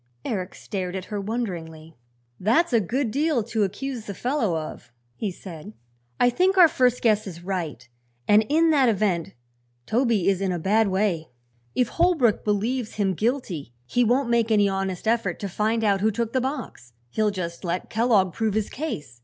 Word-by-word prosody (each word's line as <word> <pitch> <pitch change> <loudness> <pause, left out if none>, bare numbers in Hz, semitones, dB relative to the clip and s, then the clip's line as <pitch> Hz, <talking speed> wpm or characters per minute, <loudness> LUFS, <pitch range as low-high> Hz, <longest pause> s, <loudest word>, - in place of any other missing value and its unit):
Eric 190 -4 -3
stared 185 -2 -4
at 190 -1 -4
her 205 - -1
wonderingly. 170 -8 -5 0.4
"That's 245 - +2
a 230 - +5
good 235 +5 -1
deal 285 -2 +1
to 220 0 -2
accuse 225 +4 -3
the 200 - -6
fellow 240 - 0
of," 155 -6 -7 0.2
he 210 - -2
said. 165 - -9 0.5
"I 245 - +4
think 370 +8 +2
our 355 -2 +9
first 250 -4 +1
guess 215 -3 +3
is 170 -2 -8
right, 165 -10 -4 0.4
and 210 +1 +6
in 325 +2 +4
that 275 -5 +4
event 195 -6 0 0.5
Toby 230 -5 +1
is 195 -1 +2
in 195 -1 0
a 175 - -1
bad 210 +6 +2
way. 190 -4 0 0.5
If 245 -2 +2
Holbrook 330 - +2
believes 220 +3 -1
him 195 -3 +1
guilty 190 - -2
he 245 - +1
won't 245 +3 +2
make 235 -1 +2
any 205 -2 +4
honest 195 0 -2
effort 220 -6 +1
to 200 - -4
find 220 +4 0
out 200 -2 +2
who 215 - +3
took 230 +1 -2
the 260 - +2
box. 255 - -5 0.2
He'll 215 - +1
just 175 -4 -5
let 175 0 -3
Kellogg 215 -6 +3
prove 220 -2 -1
his 215 -2 -1
case. 145 - -5
210 Hz, 180 wpm, -24 LUFS, 185-240 Hz, 0.5 s, our